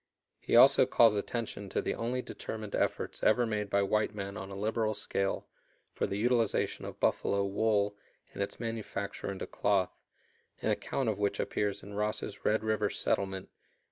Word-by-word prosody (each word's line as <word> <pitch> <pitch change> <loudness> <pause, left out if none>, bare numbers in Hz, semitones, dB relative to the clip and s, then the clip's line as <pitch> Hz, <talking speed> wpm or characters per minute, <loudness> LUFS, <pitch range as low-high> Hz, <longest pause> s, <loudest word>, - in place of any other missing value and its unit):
He - - 0
also - - +8
calls 115 -3 +5
attention 105 -1 -3
to - - -1
the - - -1
only 125 +2 -2
determined 110 -2 -6
efforts - - -1
ever 120 +3 +4
made 105 -2 -2
by 100 0 +3
white 105 +1 +1
men 100 -1 -5
on 95 0 -6
a 100 - -7
liberal 110 +1 0
scale 100 -1 -1 0.5
for - - -1
the 100 - -3
utilization 115 0 +1
of - - -8
buffalo 100 0 +1
"wool" 105 0 +1 0.4
and - - -5
its 100 - -3
manufacture 110 -4 -4
into 95 - -5
cloth, 95 -3 +1 0.6
an - - 0
account 135 - -1
of 105 -2 0
which 100 -1 0
appears 100 -2 -1
in 100 +2 -9
Ross's 105 0 -3
"Red 110 +1 +2
River 110 -1 +1
Settlement," 95 -1 -1
pp. - - -41
105 Hz, 170 wpm, -31 LUFS, 100-110 Hz, 0.6 s, also